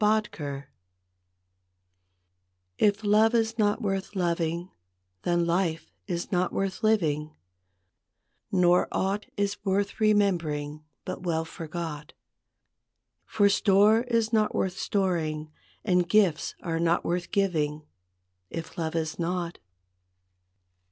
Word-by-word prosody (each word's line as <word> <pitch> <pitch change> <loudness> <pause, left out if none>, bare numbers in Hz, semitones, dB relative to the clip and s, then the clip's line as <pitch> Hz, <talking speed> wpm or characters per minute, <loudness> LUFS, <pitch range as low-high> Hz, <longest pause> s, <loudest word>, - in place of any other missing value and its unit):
T 210 -6 +1 2.4
F 205 +1 +3
love 215 +3 +4
is 225 0 0
not 210 +2 +2
worth 195 0 -2
loving, 170 -1 -1 0.5
then 175 -1 +1
life 170 -1 -1 0.2
is 175 -3 -3
not 180 -1 +1
worth 195 +1 -2
living, 155 -8 +1 1.2
Nor 180 -1 +4
aught 195 +2 -1
is 205 0 -1
worth 200 +1 0
remembering, 170 -9 +1 0.2
but 185 - -5
well 165 -3 -1
forgot, 160 -2 -6 1.1
For 205 -1 +3
store 205 +2 +4
is 230 -2 +1
not 215 -1 +2
worth 185 -1 0
storing, 160 -7 -1 0.3
and 180 -4 +2
gifts 190 -6 +2
are 165 -2 -1
not 170 +1 +1
worth 175 0 -1
giving, 155 -6 0 0.7
If 165 0 -7
love 160 0 -2
is 160 0 -2
not. 175 0 -2
180 Hz, 105 wpm, -27 LUFS, 165-205 Hz, 2.4 s, love